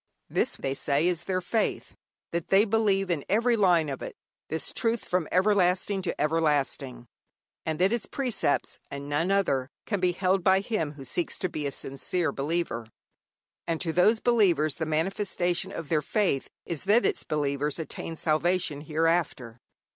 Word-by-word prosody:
This, - - +1
they 135 - -3
say, 140 +3 +1
is 175 -1 -1
their 185 -1 -1
faith: 220 +5 -1 0.4
that 170 0 -2
they 195 +4 +5
believe 200 -3 +1
in 155 -5 -1
every 230 +4 +3
line 180 -7 +4
of 135 -2 -5
it, - - -6 0.3
this 160 - -3
truth 230 0 0
from 180 -3 0
everlasting 190 0 +2
to 175 -2 -3
everlasting, 145 -5 0 0.6
and 160 -1 -1
that 190 +6 +3
its 235 -3 -2
precepts, 250 - -1
and 140 0 -6
none 150 +5 0
other, 140 -10 +1 0.2
can 205 -3 -1
be 180 -1 +2
held 185 +1 +1
by 190 +1 +4
him 195 -9 -2
who 140 -2 -10
seeks 170 +5 -2
to 185 - -2
be 150 -3 -3
a - - -3
sincere 160 +6 -1
believer. 140 -6 -2 0.8
And 165 -1 -1
to 165 -2 -1
these 210 +6 +4
believers 180 - +3
the 160 +1 -4
manifestation 180 +2 -1
of 165 -6 -6
their 155 -2 +2
faith 180 -4 0 0.2
is 170 0 -4
that 215 +5 +4
its - - 0
believers 145 -1 -1
attain 165 0 -6
salvation 160 -1 +1
hereafter. 155 -6 0
170 Hz, 165 wpm, -27 LUFS, 150-195 Hz, 0.8 s, they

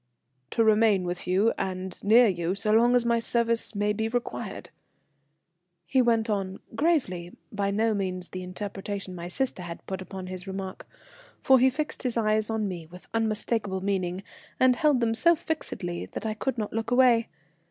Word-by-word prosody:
"To 230 - +2
remain 215 -3 +4
with 175 0 -4
you 195 +5 +3
and 185 0 -3
near 230 +4 +7
you 180 -3 0
so 210 +2 0
long 235 +3 +5
as 245 -1 +3
my 235 0 +2
services 230 -1 +1
may 205 +1 +1
be 220 +1 -1
required," 240 +1 -4 1.1
he 255 +10 +3
went 230 -2 +2
on, 195 -3 -2
gravely, 190 - 0
by 200 -1 -1
no 220 +2 +1
means 185 -3 -3
the 185 - -6
interpretation 195 +1 -5
my 175 -1 -6
sister 250 +2 -2
had 170 -1 -8
put 190 -1 -4
upon 190 0 -7
his 185 +1 -6
remark; 190 -1 -6 0.5
for 265 -1 +6
he 260 +2 +5
fixed 300 +4 -4
his 250 -3 -1
eyes 215 -1 +2
on 220 -2 -1
me 175 -4 -6
with 180 +2 -14
unmistakable 220 -3 -1
meaning, 190 -1 -1 0.4
and 255 -1 +5
held 300 -6 +3
them 225 -1 +2
so 340 +9 +4
fixedly 300 - -4
that - - -7
I 220 - 0
could 250 +4 -3
not 215 -2 -3
look 225 0 -2
away. 245 -2 +4
210 Hz, 175 wpm, -27 LUFS, 185-235 Hz, 1.1 s, near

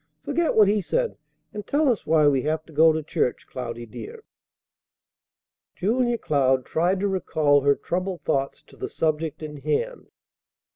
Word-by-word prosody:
"Forget 340 -1 0
what 215 -2 +6
he 205 +1 +2
said, 485 - -1 0.4
and 210 -1 -7
tell 295 +1 +2
us 240 -5 0
why 155 -1 +4
we 135 -2 +3
have 155 +3 -2
to 160 - -16
go 160 +2 +6
to 160 0 -2
church, 125 - -1
Cloudy, 120 -2 -6
dear." 435 - -10 1.5
Julia 240 +4 +1
Cloud 130 - +1
tried 180 +4 +1
to 205 - +1
recall 155 -7 +2
her 140 +1 +3
troubled 180 0 -3
thoughts 135 -3 -1
to - - -19
the - - -5
subject 155 -1 -2
in 150 -1 -7
hand. 155 - -2
160 Hz, 160 wpm, -24 LUFS, 145-210 Hz, 1.5 s, what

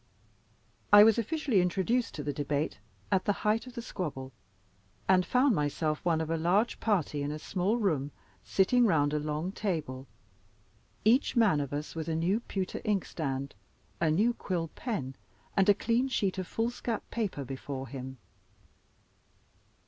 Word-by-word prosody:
I 205 0 +10
was 225 +1 +5
officially 255 - +1
introduced 195 +7 0
to 150 - -4
the 145 0 -2
debate 145 -2 -2 0.3
at 190 - +2
the 205 - +3
height 220 +4 +2
of 250 - -11
the 235 - -5
squabble; 135 - -5 0.7
and 185 -1 +5
found 255 +5 +3
myself 150 -1 -1
one 165 -2 +2
of 160 0 -3
a 165 - +1
large 185 +8 +1
party 175 -9 0
in 145 - -2
a 150 - -4
small 190 +7 -1
room, 155 - 0 0.3
sitting 240 +5 +3
round 150 -5 +2
a 150 - +1
long 150 +4 -2
table, 155 - -3 1.0
each 245 +6 +4
man 205 -11 +4
of 140 - -4
us 145 +1 -4
with 160 -1 -5
a 160 - -1
new 175 +7 +1
pewter 190 -5 -4
inkstand, 140 -9 -2 0.5
a 165 - +2
new 210 +10 +3
quill 175 -7 -3
pen, 140 - -4 0.4
and 195 0 +4
a 205 - +7
clean 235 +5 +1
sheet 200 -7 -1
of 185 - -4
foolscap 230 0 -2
paper 200 -12 -2
before 135 +1 -6
him. 130 +1 -7
180 Hz, 155 wpm, -30 LUFS, 150-215 Hz, 1.0 s, I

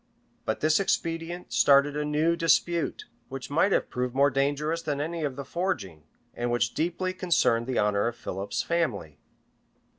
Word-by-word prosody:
But 110 - -2
this 155 +2 +3
expedient 170 -2 -2
started 140 +1 +5
a 150 - -1
new 150 +3 +1
dispute, 170 0 +1 0.2
which 135 +1 -7
might 165 +7 +3
have - - +1
proved 125 0 -2
more 140 +1 +4
dangerous 145 +5 0
than 145 -3 -2
any 165 +2 -3
of 140 -3 -2
the 140 0 -6
foregoing, 100 - -3 0.3
and 120 0 -2
which 120 -1 0
deeply 175 +3 -1
concerned 165 -11 +1
the 130 - -1
honor 105 0 +2
of 120 - -3
Philip's 100 -4 -4
family. 165 - -2
145 Hz, 160 wpm, -27 LUFS, 120-165 Hz, 0.3 s, started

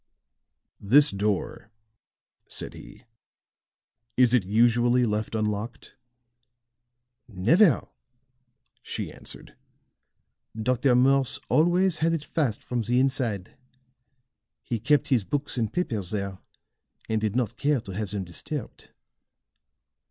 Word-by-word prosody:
"This 140 +9 +5
door," 100 0 -2 0.8
said - - -5
he; - - -13 1.1
"is 125 -1 +5
it 125 -5 +4
usually 120 +4 +3
left 105 0 -2
unlocked?" 105 +2 -3 1.3
"Never," 125 - +3 0.9
she - - -5
answered. - - -10 1.0
"Dr. 125 +2 +2
Morse 135 +1 +3
always 175 +2 +3
had 165 +1 +2
it 160 -3 -2
fast 140 -8 -1
from 125 -1 -2
the 120 +2 +1
inside. 130 -8 -1 1.1
He 115 - -3
kept 130 +5 +2
his 125 -6 +3
books 145 +6 -2
and 110 -2 -1
papers 110 - -2
there, 100 -3 -4 0.7
and 110 -1 -1
did 110 0 -1
not 120 -2 -1
care 145 -1 +1
to 100 - -9
have 105 +1 -4
them 100 -1 -3
disturbed." 105 - -7
120 Hz, 105 wpm, -26 LUFS, 105-135 Hz, 1.3 s, This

